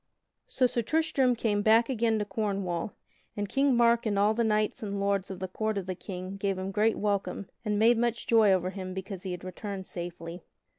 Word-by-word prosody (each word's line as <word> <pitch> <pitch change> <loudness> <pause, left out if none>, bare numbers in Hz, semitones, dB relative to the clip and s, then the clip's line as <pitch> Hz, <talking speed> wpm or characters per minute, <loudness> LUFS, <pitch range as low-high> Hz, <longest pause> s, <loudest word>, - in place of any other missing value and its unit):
_ - - -55 0.5
So 255 - +3
Sir 240 -1 +1
Tristram 275 -2 +2
came 210 -3 0
back 225 +2 +5
again 230 -3 +1
to 210 - -1
Cornwall, 195 -3 -2 0.4
and 205 0 -1
King 270 +3 +2
Mark 235 -1 +4
and 205 -2 0
all 205 +2 +4
the 235 +1 +1
knights 215 -1 +1
and 200 -2 -3
lords 200 -1 0
of 190 - -5
the 190 +1 -4
court 215 +3 -2
of 195 - -3
the 185 - -3
King 185 +1 -7
gave 195 -1 -1
him 190 +1 -3
great 215 +2 +2
welcome 200 -2 -2
and 210 -2 0
made 225 +2 +5
much 235 -1 0
joy 220 -3 +5
over 185 -1 +1
him 185 -1 -6
because 190 -1 -6
he 190 - -5
had 180 0 -6
returned 190 +1 -6
safely. 175 -1 -7
205 Hz, 215 wpm, -29 LUFS, 190-225 Hz, 0.5 s, back